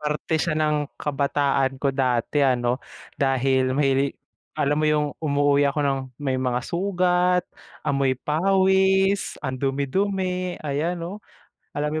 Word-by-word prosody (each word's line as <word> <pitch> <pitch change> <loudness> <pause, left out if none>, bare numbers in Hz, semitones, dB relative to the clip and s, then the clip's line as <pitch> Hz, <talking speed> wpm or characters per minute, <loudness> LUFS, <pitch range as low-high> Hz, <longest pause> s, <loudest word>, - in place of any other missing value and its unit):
parte 150 +1 -1
siya 165 -1 0
ng 150 -2 0
kabataan 140 -2 0
ko 135 +1 0
dati 130 +1 0
ano, 125 -1 +1 0.4
dahil 130 -1 +2
may 140 -1 +1 0.4
alam 145 +1 +1
mo - - +1
yung 150 -1 +2
umuuwi 145 -1 +2
ako 140 - -3
ng 135 -1 +1 0.3
may 130 -2 0
mga 125 -1 0
sugat, 180 -1 +1 0.4
amoy 140 -3 +1
pawis, 190 +5 +2
ang 130 -1 -3
dumi-dumi, 180 +6 -1
ayan 150 +5 -1
'no? 170 +1 -5 0.6
Alam 150 +1 -1
145 Hz, 125 wpm, -24 LUFS, 135-175 Hz, 0.6 s, dahil